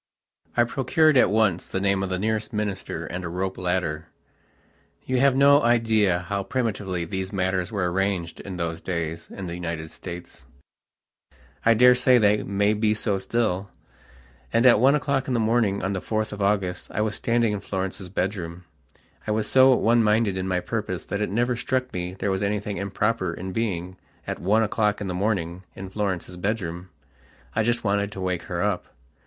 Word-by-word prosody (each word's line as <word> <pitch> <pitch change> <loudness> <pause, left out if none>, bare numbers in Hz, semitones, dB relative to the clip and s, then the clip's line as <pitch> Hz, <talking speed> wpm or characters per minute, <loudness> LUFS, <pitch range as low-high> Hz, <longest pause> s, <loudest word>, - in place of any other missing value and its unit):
I 120 - +6
procured 140 +5 +2
at 125 - +5
once 105 -4 +2
the 95 - -2
name 100 0 +1
of 95 - -2
the 95 - -1
nearest 110 +2 -1
minister 105 -3 -3
and 90 +2 -5
a 85 - -4
rope 95 +2 -2
ladderyou 90 -4 -1 1.1
have 130 +1 +3
no 140 +1 +6
idea 110 -6 +3
how 100 +3 -2
primitively 100 -7 -2
these 95 +2 -4
matters 95 -2 -1
were 95 -5 -1
arranged 95 -3 -1
in 95 -2 -7
those 85 -1 -3
days 85 -2 -4
in 95 - -7
the 85 - -5
United 80 -2 -5
States. 90 -1 -9 1.2
I 115 0 +5
daresay 125 +2 +6
that 105 -2 +3
may 100 +2 +2
be 110 0 +1
so 105 -2 0
still. 100 -3 -1 0.8
And 115 +2 +3
at 120 -4 +7
one 135 +4 +5
o'clock 140 -2 0
in 130 - 0
the - - +2
morning 110 -3 +1
of 95 +1 -1
the 95 - -3
4th 110 -1 -2
of 105 - -6
August 100 -3 0
I 105 - -2
was 105 -1 0
standing 115 0 +1
in 105 - -2
Florence's 95 -1 -4
bedroom. 90 -2 -3 0.6
I - - -2
was 105 0 +1
so 130 0 +6
one 120 0 +3
minded 105 -2 +2
in 95 0 -2
my 90 -1 0
purpose 105 -3 -3
that 100 - -3
it 105 - 0
never 120 +4 +1
struck 130 +2 -2
me 90 0 -4
there 100 +1 -1
was 95 0 -1
anything 105 0 -2
improper 100 -2 -1
in 95 +1 -6
being, 95 -4 -2 0.3
at - - -4
one 105 +5 +3
o'clock 105 -1 +1
in 105 - -4
the 95 - -3
morning, 90 -2 -1
in 95 -1 -8
Florence's 95 -3 -3
bedroom. 90 -3 -3 0.7
I 110 - +3
just 120 +1 +1
wanted 100 -1 0
to - - -7
wake 90 -2 -1
her 85 0 -1
up. 100 -3 -1
100 Hz, 185 wpm, -25 LUFS, 90-110 Hz, 1.2 s, at